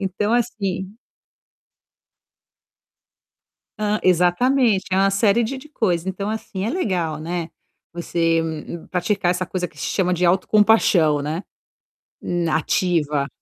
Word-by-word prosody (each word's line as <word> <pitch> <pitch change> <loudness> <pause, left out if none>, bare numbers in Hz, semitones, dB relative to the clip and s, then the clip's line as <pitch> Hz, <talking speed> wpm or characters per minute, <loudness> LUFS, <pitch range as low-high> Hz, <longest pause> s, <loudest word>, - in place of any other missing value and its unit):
Então, 200 +3 -1
assim 200 -6 -1 2.9
Hã 210 0 0
exatamente, 190 +5 +3
é 185 - +1
uma 195 +1 +4
série 210 +3 +2
de 265 +5 -4
de 305 +3 -12
coisa. 185 - -1
Então, 195 +2 -3
assim, 215 -3 -4
é 225 - -1
legal, 180 - -1
né. 170 +1 -4 0.4
Você 165 -1 0 0.5
praticar 180 0 0
essa 180 0 -1
coisa 180 -2 -3
que 150 - -21
se - - -3
chama 180 -2 0
de 180 0 +1
"autocompaixão", 185 -5 +3
né. 155 +6 -3 1.1
Ah, 155 - +2
ativa. 150 -4 0
185 Hz, 120 wpm, -21 LUFS, 170-210 Hz, 2.9 s, uma